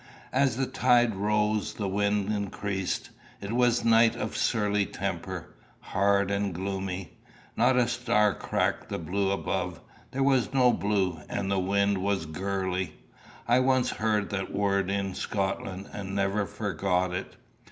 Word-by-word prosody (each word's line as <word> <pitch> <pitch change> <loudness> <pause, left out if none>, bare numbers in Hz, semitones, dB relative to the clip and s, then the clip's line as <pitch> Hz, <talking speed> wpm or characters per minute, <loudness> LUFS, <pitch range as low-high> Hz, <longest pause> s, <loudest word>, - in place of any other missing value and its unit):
As 130 -2 +2
the 135 - +1
tide 125 -2 +3
rose 105 +1 +1
the 100 - -2
wind 100 +1 +1
increased. 100 -2 -3 0.3
It 100 +1 -6
was 120 -1 +3
a - - 0
night 115 0 +5
of - - -4
surly 105 -2 +1
temper - - -4 0.3
hard 100 0 +1
and 100 -2 -1
gloomy. 95 -1 -4 0.4
Not 130 - +3
a 125 -2 +4
star 105 -4 +2
cracked - - -1
the - - -2
blue 95 +4 -1
above 95 -3 -2 0.3
there 135 +1 -1
was 135 -1 +2
no 125 -2 +5
blue; 95 -5 0
and 100 -1 -2
the 100 - +2
wind 100 +1 +1
was 95 -3 0
gurly; 95 +1 -2 0.5
I 120 +2 +5
once 130 -1 +2
heard 105 -2 0
that 95 -1 -3
word 100 -1 +1
in 100 -1 -1
Scotland, 95 0 -3
and 95 -1 -5
never 100 +1 +1
forgot 90 +1 -1
it. 95 - -5
100 Hz, 150 wpm, -28 LUFS, 95-110 Hz, 0.5 s, night